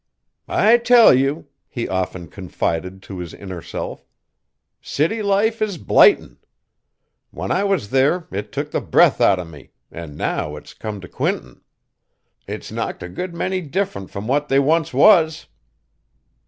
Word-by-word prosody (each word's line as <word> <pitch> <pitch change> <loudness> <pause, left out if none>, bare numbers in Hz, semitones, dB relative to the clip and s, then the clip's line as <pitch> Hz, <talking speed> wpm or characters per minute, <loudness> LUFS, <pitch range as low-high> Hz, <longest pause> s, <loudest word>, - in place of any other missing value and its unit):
"I 225 +3 +4
tell 235 -1 +7
you!" 140 +4 0 0.2
he 120 - -4
often 95 -2 -3
confided 90 0 -4
to 95 -2 -8
his 85 -2 -7
inner 95 -4 -8
self, - - -6 0.8
"city 165 +10 -1
life 210 +3 +1
is 205 -4 -1
blightin'! 410 - +4 0.9
When - - -5
I 195 - +1
was 195 - -1
there, 140 +6 +2
it 100 +2 -5
took - - -4
the - - -1
breath - - +3
out 95 - +5
o' 90 - -5
me, 75 -4 -14 0.2
an' 80 -3 -9
now 75 0 -2
it's 75 - -12
come 105 -3 -7
t' 90 - -10
Quinton, 65 -6 -3 0.9
it's - - -7
knocked - - -4
a 90 - -7
good 175 - -6
many 185 +2 -2
different 155 - -3
from 100 +1 -7
what 145 +3 0
they 135 - +3
once 155 +3 +2
was!" 160 +2 +4
135 Hz, 155 wpm, -20 LUFS, -, 0.9 s, tell